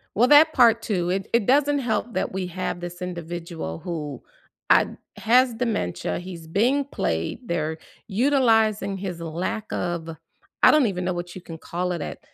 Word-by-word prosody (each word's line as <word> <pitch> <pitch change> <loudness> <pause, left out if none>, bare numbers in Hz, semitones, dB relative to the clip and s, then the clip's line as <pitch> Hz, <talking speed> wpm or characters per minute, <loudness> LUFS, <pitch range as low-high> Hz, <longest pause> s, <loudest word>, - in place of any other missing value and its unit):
Well, 240 +4 +4
that 305 +3 +7
part 230 -2 +5
too, 180 -6 -1
it 190 +1 -1
it 235 -3 +3
doesn't 285 +3 +3
help 240 -1 -2
that - - -1
we 185 -1 -2
have 180 0 -4
this 175 +1 -7
individual 170 - -5
who 155 -5 -5 0.5
I - - +6 0.3
has 245 +2 +4
dementia, 225 - -2
he's 175 -3 -9
being 245 - +2
played, 80 - -2
they're 160 -3 -2 0.3
utilizing 225 -4 +2
his 185 -3 -5
lack 170 +6 -3
of 170 -2 -3 0.5
I - - +9
don't 305 -3 +4
even 180 -3 -3
know 185 - 0
what 175 0 -6
you 185 - -8
can 165 -1 -9
call 180 +3 -3
it 170 - -4
at - - -6
185 Hz, 170 wpm, -24 LUFS, 170-230 Hz, 0.5 s, I